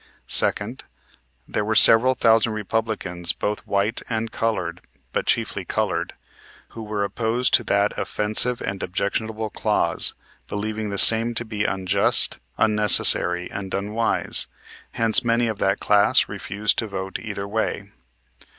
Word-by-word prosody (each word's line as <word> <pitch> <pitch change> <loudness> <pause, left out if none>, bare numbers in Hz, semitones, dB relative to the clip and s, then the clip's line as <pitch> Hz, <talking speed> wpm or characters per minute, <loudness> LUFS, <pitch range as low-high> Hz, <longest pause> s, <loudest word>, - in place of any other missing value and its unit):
Second. 110 +5 +2 0.6
There - - -3
were 110 +1 -2
several 125 +5 +6
thousand 115 -1 +2
Republicans 105 -5 -3
both 105 0 -5
white 100 +3 -1
and 115 -1 -3
colored, 90 -7 -3 0.3
but - - -3
chiefly - - -1
colored, - - -3 0.6
who 115 - -10
were 105 -1 -4
opposed 115 +4 -2
to 120 - +3
that 100 +1 0
offensive 110 +4 +1
and 95 0 -5
objectionable 110 +4 -4
clause, - - 0 0.3
believing 105 +1 -5
the 100 - -5
same 115 +3 +8
to 120 - -1
be 105 -2 -4
unjust, 95 -1 +1 0.2
unnecessary, 105 -4 +2
and 95 -1 -6
unwise; 105 +4 0 0.5
hence, 115 +2 +4
many 120 0 0
of 110 -3 -4
that 95 +1 0
class 105 0 +2
refused 105 +2 -3
to 115 - -3
vote 95 -1 -6
either 100 -3 -7
way. 110 +2 -4
105 Hz, 130 wpm, -21 LUFS, 100-115 Hz, 0.6 s, same